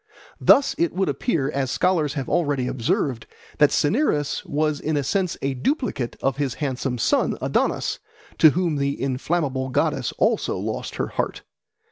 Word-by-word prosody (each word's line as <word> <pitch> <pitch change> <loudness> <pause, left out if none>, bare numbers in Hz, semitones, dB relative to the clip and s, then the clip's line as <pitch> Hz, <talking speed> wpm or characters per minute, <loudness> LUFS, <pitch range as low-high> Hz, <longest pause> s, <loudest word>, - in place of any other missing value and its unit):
Thus 280 - +5
it 170 -1 +1
would 190 -2 0
appear, 145 - -1
as 135 -2 -1
scholars 160 -3 +1
have 135 -3 -3
already 145 -7 +1
observed, 125 0 -1 0.3
that 150 -2 +6
Cinyras 150 - +1
was 150 0 0
in 155 -1 -1
a 145 - 0
sense 185 +4 -1
a 135 0 0
duplicate 135 - -2
of 135 0 +1
his 140 -4 -1
handsome 130 -3 -2
son 115 - +1
Adonis, - - 0 0.4
to 160 - +9
whom 170 0 0
the 140 0 -1
inflammable 135 0 -1
goddess 130 - 0
also - - +1
lost - - -4
her - - -2
heart. - - -3
145 Hz, 155 wpm, -23 LUFS, 135-165 Hz, 0.4 s, to